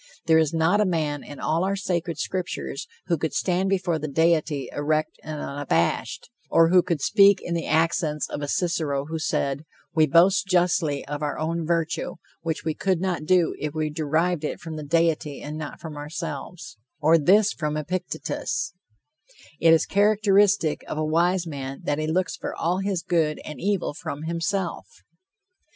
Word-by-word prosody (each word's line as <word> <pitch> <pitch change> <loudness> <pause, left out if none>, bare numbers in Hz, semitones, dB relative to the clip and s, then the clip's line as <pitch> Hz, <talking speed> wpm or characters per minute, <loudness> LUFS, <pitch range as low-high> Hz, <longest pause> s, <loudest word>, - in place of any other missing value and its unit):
There 160 -1 +5
is 160 -3 +2
not 165 +6 +2
a - - +5
man 155 -5 -1
in 145 - -10
all 160 +3 0
our 195 +1 0
sacred 175 -4 -2
scriptures 180 -5 -4 0.2
who 170 -4 0
could 160 -2 -2
stand 185 +1 +1
before 180 -4 0
the 155 - -3
deity 155 -1 +1
erect 155 +1 -1
and 155 -1 -5
unabashed, 140 - -1 0.2
or 165 0 +5
who 180 +1 +6
could 170 -4 -2
speak 200 +1 +5
in 175 - -4
the 165 -1 -2
accents 160 -2 +1
of 145 - -5
a 145 - -3
Cicero 150 -4 0
who 160 +1 -4
said, 140 -2 -1 0.3
"We 155 -2 +4
boast 180 +7 +4
justly 175 -5 +1
of 145 0 -5
our 145 -1 -2
own 165 +1 -2
virtue, 165 0 -1 0.3
which 160 -1 -3
we 160 - 0
could 185 +1 0
not 180 -4 -2
do 180 -1 +3
if 150 0 -4
we 155 -1 -1
derived 160 +2 0
it 150 - -3
from 165 -2 -7
the 155 - -5
deity 155 -1 +1
and 150 +1 -6
not 155 -2 -6
from 160 -3 -8
ourselves," 150 -1 -6 0.2
or 160 +2 +5
this 200 +7 +4
from 150 -2 -2
Epictetus, 165 0 -3 0.9
"It 165 - +5
is 165 - +5
characteristic 200 -4 +3
of - - -4
a 155 - 0
wise 175 +3 +2
man 135 -3 -6
that 145 +1 -1
he 155 - -1
looks 175 +2 0
for - - -5
all 175 +3 0
his 195 -3 -1
good 160 -3 +1
and 150 -4 -8
evil 195 -5 0
from 145 0 -6
himself." 170 +3 -2
165 Hz, 175 wpm, -25 LUFS, 150-180 Hz, 0.9 s, who